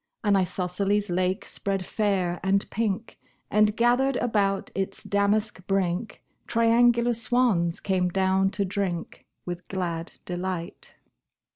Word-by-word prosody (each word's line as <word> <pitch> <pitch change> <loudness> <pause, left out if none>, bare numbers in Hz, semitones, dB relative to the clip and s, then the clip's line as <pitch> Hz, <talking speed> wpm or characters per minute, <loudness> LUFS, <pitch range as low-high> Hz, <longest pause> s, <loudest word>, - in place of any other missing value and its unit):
An 205 -2 +3
isosceles 190 +2 0
lake 185 +2 0
spread 195 -2 -3
fair 190 -5 0
and 195 +1 +1
pink, 220 0 -2 0.3
And, 210 0 +3
gathered 245 +3 +3
about 200 -5 0
its 195 -1 -3
damask 205 0 +1
brink, 195 +2 -1 0.2
Triangular 235 +1 +4
swans 225 -7 +1
came 185 -2 0
down 190 +1 +2
to 200 - +1
drink 185 -3 -3 0.2
With 175 0 -6
glad 170 -3 -3
delight. 180 -1 -5
195 Hz, 115 wpm, -26 LUFS, 180-215 Hz, 0.3 s, Triangular